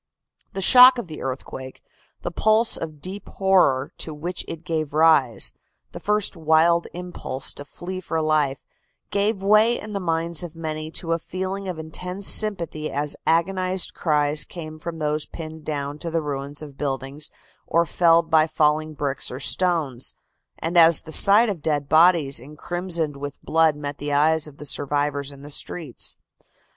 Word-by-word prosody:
The 195 - -2
shock 255 +4 +9
of 235 -6 -5
the 155 - -8
earthquake, 130 0 -7 0.4
the - - -3
pulse 220 +2 +3
of 155 -3 -6
deep 195 +2 -6
horror 180 -9 +2
to 155 - -4
which 170 +4 -3
it 165 0 -7
gave 155 -2 -3
rise, 155 -7 +3 0.4
the - - -8
first 210 -1 0
wild 165 +1 +3
impulse 175 -6 -4
to 145 - -8
flee 185 +5 -7
for 165 -2 -2
life, 155 -3 0 0.5
gave 200 0 0
way 215 +4 +4
in 210 0 -8
the 200 - -2
minds 165 -2 -1
of 170 -2 -7
many 155 -1 -5
to 165 -2 -3
a 165 - +1
feeling 190 +3 -5
of 180 -3 -4
intense 180 +5 -4
sympathy 170 -7 +1
as 145 +1 -1
agonized 185 +2 +1
cries 150 -2 +3
came 155 -3 -9
from 165 +1 -6
those 150 -1 -2
pinned 160 -1 -9
down 145 -1 -4
to 170 - -5
the 165 -1 -1
ruins 145 +1 -4
of 140 -2 -12
buildings 140 +1 -3 0.4
or 170 +1 +2
felled 165 0 +3
by 160 0 +5
falling 155 0 0
bricks 140 -2 -3
or 125 - -7
stones, 155 -6 -1 0.4
and 170 +2 +1
as 165 -1 +6
the 160 - -9
sight 205 +8 +6
of 195 -7 -4
dead 145 -2 -1
bodies 160 -4 +4
incrimsoned 160 +2 -4
with 145 0 -7
blood 160 -1 +3
met 145 -1 -5
the 145 0 -4
eyes 155 +2 +2
of 145 -2 -14
the 150 - -9
survivors 145 0 -1
in 140 0 -14
the 145 - -8
streets. 150 -2 -3
160 Hz, 170 wpm, -23 LUFS, 145-180 Hz, 0.5 s, shock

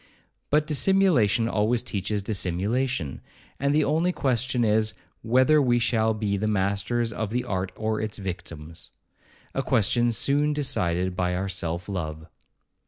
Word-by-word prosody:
But 150 +1 +3
dissimulation 150 - +3
always 115 +2 +1
teaches 100 -3 -2
dissimulation; 100 - -1 0.4
and 140 +1 +1
the 150 +1 +3
only 160 +5 +1
question 125 -5 0
is, 110 0 +1 0.3
whether 130 +6 +4
we 120 -3 +3
shall 110 -2 +1
be 105 -2 -1
the 110 +2 -1
masters 105 +3 0
of 110 -1 -3
the 120 +3 -1
art 95 -5 -3
or 110 0 -2
its 110 -1 -3
victims? 85 -4 -7 0.6
a 135 - 0
question 120 -1 +2
soon 145 +6 +2
decided 95 -10 0
by 90 0 0
our 95 +2 -2
self 85 -1 -3
love. 80 -5 -5
110 Hz, 140 wpm, -25 LUFS, 95-125 Hz, 0.6 s, whether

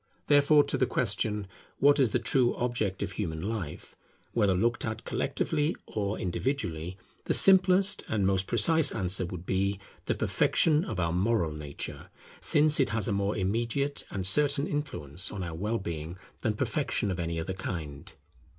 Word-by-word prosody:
Therefore 145 +1 +5
to - - -2
the 130 - +2
question, 105 -2 -1 0.3
What 145 +1 +4
is 130 -4 +4
the 115 - +1
true 120 0 +2
object 115 -6 -2
of 100 - -4
human 85 -5 -4
life, 95 -4 -5 0.4
whether 100 -5 +2
looked 115 +6 0
at 110 0 -4
collectively 150 +2 -1
or 105 0 -3
individually? 90 - -3 0.3
the - - +4
simplest 190 0 +5
and 105 -3 0
most 95 0 +1
precise 160 +6 +3
answer 95 -1 -1
would 90 -1 -8
be, 95 +1 0 0.3
the - - +1
perfection 155 0 +2
of 90 - -4
our 85 -2 0
moral 95 -2 +1
nature; 75 -2 -7 0.3
since 150 0 +4
it 135 - +3
has 110 -3 -1
a - - 0
more 100 +1 -1
immediate 115 +9 -1
and 95 -2 -3
certain 140 +7 +3
influence 95 - -3
on 100 -3 -5
our 85 -2 -5
well 105 +8 -2
being 85 -3 -6 0.2
than - - 0
perfection 100 - -1
of 90 - -4
any 85 -1 -2
other 90 +4 -3
kind. 80 -2 -6
100 Hz, 165 wpm, -28 LUFS, 90-130 Hz, 0.4 s, Therefore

